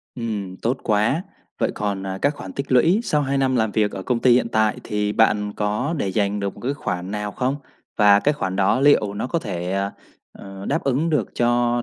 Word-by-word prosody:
Ừm, 105 -6 -4
tốt 120 +7 -1
quá! 110 +9 +1 0.4
Vậy - - +1
còn, 100 -2 -3
à, 95 0 -4
các 145 +1 +2
khoản 95 -8 -8
tích 140 -1 -4
lũy 165 - +4
sau 150 -10 +1
2 140 0 0
năm 130 -1 +1
làm 110 -2 +1
việc 105 0 +2
ở 95 - -6
công 125 +4 0
ty 125 - +5
hiện 125 -1 +2
tại 110 -1 +1
thì 105 0 -1
bạn 105 -2 +2
có 105 +9 -1
để 100 - -1
dành 100 +1 0
được 100 -1 -3
một - - -13
cái 135 +4 -2
khoản 90 -8 -4
nào 105 0 -3
không? 130 +4 -1 0.4
Và 105 -1 +6
cái 150 +6 +2
khoản 95 -10 -3
đó 100 +6 +2
liệu 120 -8 +4
nó 105 - -3
có 150 +6 -1
thể, 90 - -4
ờ, 100 +1 -1 0.4
ờ, 95 0 -10
đáp - - 0
ứng 140 +5 +1
được 150 - +1
cho 120 0 +1
110 Hz, 230 wpm, -22 LUFS, 100-130 Hz, 0.4 s, Và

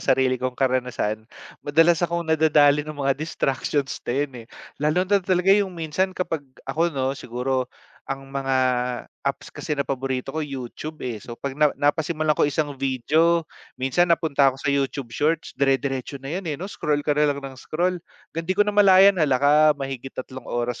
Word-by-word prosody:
sarili 130 -1 +2
kong 130 -1 -2
karanasan, 125 -4 -1 0.3
madalas 165 +3 +3
akong 170 -1 -1
nadadali 150 -2 +4
ng 150 0 -7
mga 135 -1 +1
distractions 140 -2 -1
na 120 - -3
yun, 145 -1 -1
eh, - - -26 0.3
lalo 155 +5 +2
na 200 +1 +2
talaga 185 +1 +3
yung 195 -3 +1
minsan 175 +4 -1
kapag 165 -4 -2 0.2
ako 160 +6 +1
‘no, 135 -4 -1
siguro 125 0 -2 0.4
ang 135 0 -4
mga 135 -1 0 0.6
apps 140 0 -4
kasi 150 - -4
na 140 - 0
paborito 135 0 -3
ko 160 - -2
YouTub, 140 +2 -6
eh, 115 -4 -4
so 120 +2 -9
‘pag 140 +2 -4
na 150 +2 +3
napasimulan 155 +1 +1
ko 145 - +2
isang 145 0 -1
video, 155 +6 +2 0.3
minsan 135 +7 +1
napunta 150 -5 +3
ako 130 - -3
sa 140 - +2
YouTube 135 -3 -2
shorts, 155 +5 0
dire-diretso 135 0 0
na 135 +2 -7
yan, 180 -2 -4
eh, 145 - -2
‘no. 180 - -6
Scroll 150 -7 -2
ka 150 - +2
nalang 145 -1 +1
nang 130 -1 -8
scroll, 175 +2 -1 0.3
‘gang 165 +2 -5
‘di 185 - 0
ko 205 - +5
namalayan, 200 -2 +6
hala 140 -4 +3
ka 145 +3 +3 0.2
mahigit 135 -1 -6
3 130 0 -7
oras 120 0 -2
145 Hz, 180 wpm, -23 LUFS, 135-165 Hz, 0.6 s, namalayan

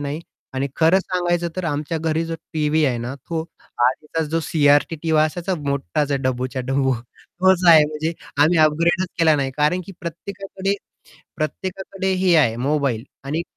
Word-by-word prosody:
नाही. 145 +2 -4 0.3
आणि 135 +1 0
खरं 165 +4 +5
सांगायचं 175 -2 -1
तर 185 - -2
आमच्या 150 +1 -2
घरी 160 +1 0
जो 165 0 -4 0.2
टीव्ही 155 0 +1
आहे 125 -3 0
ना, 120 +3 -4
तो 160 +4 -4 0.5
आधीच 150 +5 -1
जो 165 - +1
सी-आर-टी 145 +1 +3
टीव्ही 155 0 +2
असायचा 175 +4 -2
मोठाच 140 - -2
आहे, 140 - +1
डब्बूच्या 130 0 -2
डब्बू 135 0 +1
तोच 180 +10 -1
आहे. 155 -3 +9
म्हणजे 155 +2 -3 0.3
आम्ही 165 +2 +4
अपग्रेडच 170 +4 +3
केला 160 -2 +5
नाही 135 -2 -1
कारण, 150 +5 +2
की 195 - -9
प्रत्येकाकडे 195 +3 -4 0.6
प्रत्येकाकडे 190 +4 -3
हे 180 -2 +4
आहे 115 -8 +3
मोबाईल 140 -6 0 0.2
आणि 155 +5 -2
155 Hz, 160 wpm, -21 LUFS, 140-175 Hz, 0.6 s, आहे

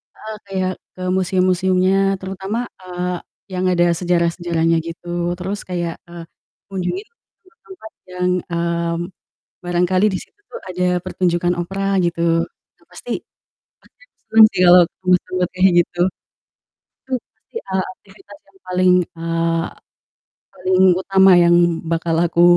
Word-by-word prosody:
heeh, 220 0 -8
kayak 190 -1 -2 0.2
ke 185 - -12
museum-museumnya, 185 +1 +2
terutama, 190 +4 -4 0.2
eee, 180 0 -3 0.4
yang 185 0 -1
ada 175 -1 +3
sejarah-sejarahnya 170 -1 +1
gitu, 170 +1 -9 0.3
terus 195 +3 -3
kayak, 175 -2 -2 0.2
eee, 170 -1 -8 0.5
kunjungi 195 - -3 0.4
tempat-tempat 370 - -15 0.2
yang, 180 0 -1 0.2
eee, 170 0 -1 0.7
barangkali 180 +2 +1
di - - 0
situ - - -27
tuh 475 - -8
ada 180 0 -2 0.2
pertunjukan 175 -1 0
opera 195 +3 -3 0.2
gitu, 170 -1 -1 0.6
yang - - -29
pasti - - -9 0.9
pasti - - -25
seru 225 - 0
sih - - -2
kalau 180 0 +8 0.2
tempat-tempat 180 0 +1
kaya 190 +1 +5
gitu. 175 0 -4 1.1
Betul, 260 -1 -2 0.2
pasti, - - -22
eee, 190 -1 0
aktivitas 290 - -17
yang 385 - -25
paling 185 0 +3 0.3
eee, 165 0 0 0.9
paling 185 0 +1 0.2
utama 190 0 +5
yang 170 0 +5 0.4
bakal 165 0 0
aku 170 0 +1
180 Hz, 120 wpm, -19 LUFS, 175-190 Hz, 1.1 s, kalau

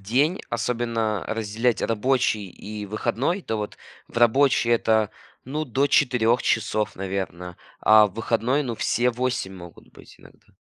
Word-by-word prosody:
день, 140 - +1
особенно 115 -3 -1
разделять 110 +1 -1
рабочий 115 -3 0
и 105 +3 -8
выходной, 120 - -1
то 110 - -3
вот 105 -1 -5 0.3
в - - -14
рабочий 120 +1 +3
это, 110 -2 +2 0.3
ну, 150 +4 -3
до 135 +3 +1
4 125 -4 +3
часов, 105 -1 0
наверно, 95 -2 -5 0.2
а 110 0 +7
в 95 - -11
выходной, 115 +5 0
ну, 120 -4 -3
все 125 +1 +1
8 125 -5 -2
могут 85 -2 -13
быть - - -16
иногда. - - -19
115 Hz, 140 wpm, -24 LUFS, 105-125 Hz, 0.3 s, а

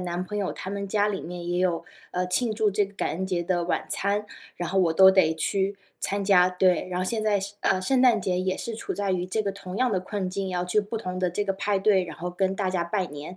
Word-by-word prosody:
男 175 0 -3
朋 210 +2 -4
友 195 - -1
他 190 - -6
们 200 0 -3
家 205 +1 +1
里 195 -2 -2
面 175 0 -6
也 175 0 0
有， 175 -2 +1 0.3
呃， 180 0 0
庆 220 +4 +1
祝 215 -1 +2
这 205 +1 +2
个 200 - -18
感 - - -1
恩 190 +3 -3
节 180 -2 -1
的 175 -1 0
晚 175 - -1
餐， 205 +1 0 0.3
然 175 -1 -3
后 195 - +1
我 170 -3 +3
都 190 +3 +8
得 185 -4 +3
去 195 +4 -1 0.2
参 200 0 -1
加。 180 -2 +5
对， 180 0 +2
然 180 - -1
后 - - 0
现 215 +3 -1
在 205 -2 +2
是 200 +1 -6
呃， 185 - +2
圣 260 +6 +2
诞 235 -5 +5
节 180 -1 0
也 185 0 0
是 230 - -5
处 - - -4
在 200 -1 -1
于 180 -1 0
这 215 +4 -1
个 200 - -1
同 195 -1 -8
样 255 -1 +2
的 190 - +1
困 190 0 -3
境， 195 0 -3
要 180 -1 -1
去 180 +4 +1
不 205 +3 -5
同 185 -3 -4
的 185 -1 +1
这 205 +4 -1
个 195 - 0
派 200 0 0
对， 195 -2 +3
然 165 -3 -8
后 175 - -4
跟 190 +1 0
大 195 -1 -1
家 175 -2 0
拜 185 +1 -1
年， 145 +5 -8
190 Hz, 300 characters per minute, -26 LUFS, 180-205 Hz, 0.3 s, 都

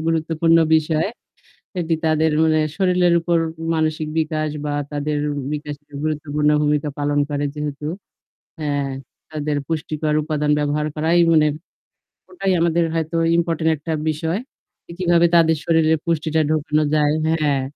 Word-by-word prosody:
গুরুত্বপূর্ণ 165 0 +2 0.2
বিষয়। 155 0 +1 0.7
এটি 165 -1 0
তাদের 160 0 +2
মানে 160 -1 +3 0.2
শরীরের 180 -2 +3
উপর 170 0 +1 0.4
মানসিক 155 -1 -1
বিকাশ 155 -1 -1 0.2
বা 145 - -2 0.2
তাদের 145 +1 -1 0.3
বিকাশের 145 -1 -7
গুরুত্বপূর্ণ 150 -1 -1
ভূমিকা 150 0 +1
পালন 145 0 0
করে 145 0 -1
যেহেতু। 150 -1 -5 0.7
হ্যাঁ 145 -2 -1 0.4
তাদের 150 -1 -2
পুষ্টিকর 155 -1 -2
উপাদান 150 -1 -1
ব্যবহার 150 +1 0
করাই 160 +3 +2
মানে 155 -2 +5 0.8
ওটাই 190 +1 -2
আমাদের 170 0 +2
হয়তো 165 0 -2 0.2
ইম্পোর্টেন্ট 165 -1 +1
একটা 160 +3 -6 0.2
বিষয়। 160 +4 -1 0.5
যে - - -12
কিভাবে 175 -1 +4
তাদের 160 -1 +4
শরীরে 160 -1 +3
পুষ্টিটা 160 -1 0
ঢোকানো 155 0 +1
যায়। 150 0 +3
হ্যাঁ। 150 -4 +1
155 Hz, 130 wpm, -21 LUFS, 150-165 Hz, 0.8 s, মানে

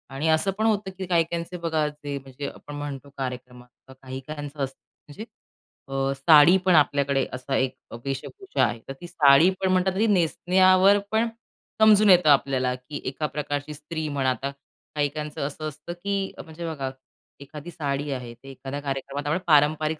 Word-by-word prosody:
आणि 150 +4 -1
असं 160 +5 +2
पण 220 - 0
होतं 205 -3 +1
की 190 - -4
काही-काहींचे 170 0 -1
बघा 160 -2 +1
जे 145 -1 -6
म्हणजे 135 +1 -7
आपण 145 - -11
म्हणतो 145 -1 -6
कार्यक्रमात 125 -1 -8
काही-काहींचं 140 +2 -6
असतं 135 0 -6 0.3
म्हणजे 155 +9 -9 0.6
अ, 135 0 -1
साडी 150 +5 +7
पण 185 -2 +5
आपल्याकडे 140 -2 +2
असा 135 +1 -3
एक 130 -1 0 0.2
अ, - - -6
वेशभूषा 380 - -3
आहे. 115 - -3
तर 135 - -5
ती 175 - -7
साडी 145 +1 +5
पण 190 -1 +2
म्हणतात 185 0 +2
ना, 225 - +3
नेसण्यावर 185 +3 +4
पण 220 +2 +2 0.5
समजून 215 -1 +6
येतं 180 -4 +6
आपल्याला 130 -2 +3
की 130 +3 -8
एका 150 +3 -3
प्रकारची 145 0 -4
स्त्री 155 +2 -5
म्हणा 140 -2 0
आता 135 +2 -3 0.4
काही-काहीचं 150 +1 -2
असं 155 +2 -6
असतं 155 +3 -7
की 200 -1 -1
म्हणजे 165 +1 -8
बघा 135 -3 -4 0.5
एखादी 150 +4 -9
साडी 145 -2 -3
आहे, 125 -3 -5
ते 120 +4 -15
एखाद्या 135 +1 -6
कार्यक्रमात 140 0 -4
आपण 150 - +1
पारंपरिक 155 +1 +3
150 Hz, 165 wpm, -25 LUFS, 135-170 Hz, 0.6 s, साडी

